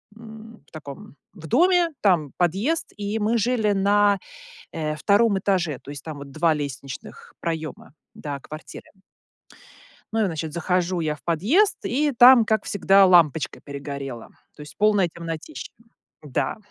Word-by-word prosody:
м, 225 0 -13
в - - -27
таком, 145 -3 -10 0.2
в 165 -5 -11
доме, 345 - +3
там 170 -8 +2
подъезд, 195 - -1
и 205 +1 -3
мы 220 +3 +1
жили 220 -2 +1
на, 200 0 +3 0.5
э, 155 -2 -3
2 200 +4 +2
этаже, 175 -8 -1
то - - -14
есть 140 -2 -9
там 155 -3 -7
вот 140 -1 -10
2 160 +2 +2
лестничных 145 - -7
проёма 160 -4 -5 0.2
до 145 -2 -6
квартиры. 155 +3 -11 1.2
Ну 225 - +1
и, - - +2
значит, 160 -2 -5
захожу 180 +1 -1
я 155 -2 -1
в - - -22
подъезд, 220 - +2
и 290 +5 +1
там, 245 -2 +7
как 220 0 0
всегда, 195 -1 +4
лампочка 160 -5 +3
перегорела. 140 -4 -7 0.3
То - - -24
есть 150 - -12
полная 205 -4 +3
темнотища. 165 - -7 0.5
Да, 145 -4 -2
180 Hz, 145 wpm, -23 LUFS, 155-220 Hz, 1.2 s, там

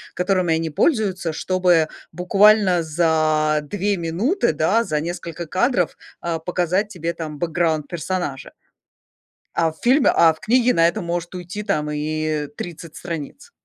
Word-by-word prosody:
которыми 180 -3 +1
они 160 0 -2
пользуются, 190 - 0
чтобы 180 -2 +2 0.2
буквально 195 0 +4
за 155 -1 +1
2 200 +6 -2
минуты, 175 - 0
да, 180 +10 +2
за 155 -8 -1
несколько 170 0 -5
кадров, 185 - 0 0.2
а, 170 -1 -3
показать 180 +4 0
тебе 170 -4 -4
там 155 -3 -6
бэкграунд 160 -2 0
персонажа. 170 -4 -4 1.0
А 165 -1 +2
в 160 - -19
фильме 260 +3 +4
а 165 -1 +5
в 160 - -19
книге 245 +5 +3
на 165 - +4
это 170 - +1
может 175 0 -4
уйти 180 +3 -6
там 155 -8 -1
и 155 0 -2
30 165 -2 -8
страниц. 170 - -7
170 Hz, 140 wpm, -21 LUFS, 155-190 Hz, 1.0 s, а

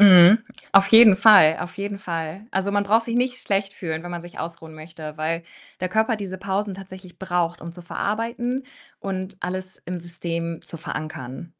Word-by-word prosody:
Mhm. 190 +1 +9 0.3
Auf 195 0 +7
jeden 225 -4 +8
Fall, 200 -7 +7
auf 180 +3 -7
jeden 200 0 -4
Fall. 165 +1 -5
Also, 195 +1 0
man 205 0 +1
braucht 225 +3 +2
sich 235 0 -2
nicht 250 0 -1
schlecht 195 0 -1
fühlen, 160 -2 -4
wenn 175 - -6
man 175 - -5
sich 175 0 -12
ausruhen 165 -1 -7
möchte, 155 -1 -10
weil 165 +2 -2 0.4
der 185 - -1
Körper 220 +4 +1
diese 190 -2 -6
Pausen 195 +1 -2
tatsächlich 185 -1 -12
braucht, 175 -2 -1
um 170 0 -8
zu 175 0 -12
verarbeiten 235 +7 -3 0.4
und 185 0 -5
alles 185 +1 -6
im 180 +1 -4
System 170 -1 -5
zu 165 - -9
verankern. 150 -2 -6
185 Hz, 180 wpm, -23 LUFS, 170-200 Hz, 0.4 s, Mhm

